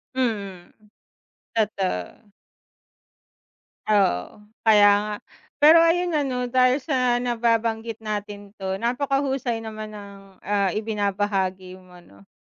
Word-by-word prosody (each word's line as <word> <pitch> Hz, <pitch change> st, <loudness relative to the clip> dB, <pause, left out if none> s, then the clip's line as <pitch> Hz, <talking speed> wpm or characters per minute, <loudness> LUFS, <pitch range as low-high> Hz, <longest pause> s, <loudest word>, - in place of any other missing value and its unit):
Mm, 200 Hz, -8 st, -3 dB, 0.8 s
totoo. 205 Hz, -, -3 dB, 1.6 s
Oo, 205 Hz, -, +1 dB, 0.2 s
kaya 205 Hz, -2 st, +7 dB
nga, 210 Hz, 0 st, -4 dB, 0.5 s
pero 315 Hz, +3 st, +8 dB
ayun 345 Hz, +1 st, +2 dB
ano 260 Hz, -5 st, -1 dB
dahil 255 Hz, +1 st, +3 dB
sa 255 Hz, -5 st, +1 dB
nababanggit 230 Hz, -2 st, -1 dB
natin 205 Hz, -1 st, -5 dB
'to 190 Hz, -1 st, -3 dB
napakahusay 265 Hz, -1 st, -1 dB
naman 215 Hz, -1 st, -7 dB
ang, 200 Hz, -1 st, -12 dB
ah, 200 Hz, -2 st, 0 dB
ibinabahagi 195 Hz, -3 st, -2 dB
mo 180 Hz, -1 st, -17 dB
'no. 100 Hz, -, -20 dB
215 Hz, 95 wpm, -23 LUFS, 195-245 Hz, 1.6 s, pero